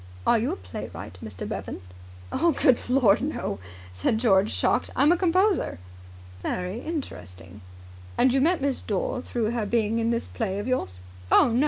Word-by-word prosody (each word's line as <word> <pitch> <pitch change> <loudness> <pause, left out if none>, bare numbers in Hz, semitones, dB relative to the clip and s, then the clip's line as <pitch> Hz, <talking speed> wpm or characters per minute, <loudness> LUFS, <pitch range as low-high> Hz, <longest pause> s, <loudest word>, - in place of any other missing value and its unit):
Are 235 - +4
you 230 - 0
a - - -2
playwright, 90 -1 -8
Mr. 100 -4 -6
Bevan?" - - -5 0.5
"Good 275 -8 +2
Lord, 250 -6 +4
no!" 270 - -3 0.3
said 90 - 0
George, 205 -3 +3
shocked. - - +1
"I'm 295 +3 +5
a - - +5
composer." 370 - +2 0.6
"Very 180 - -3
interesting. 95 - -7 0.6
And 255 0 +4
you 270 - +3
met 325 0 +2
Miss 275 -2 0
Dore 220 +5 -2
through 235 -3 -2
her 230 -3 -1
being 225 0 +1
in 230 0 +1
this 235 0 0
play 200 -4 -3
of 205 - -3
yours?" 95 - -2 0.3
"Oh, - - +6
no. 235 +1 +1
230 Hz, 165 wpm, -26 LUFS, 190-270 Hz, 0.6 s, Oh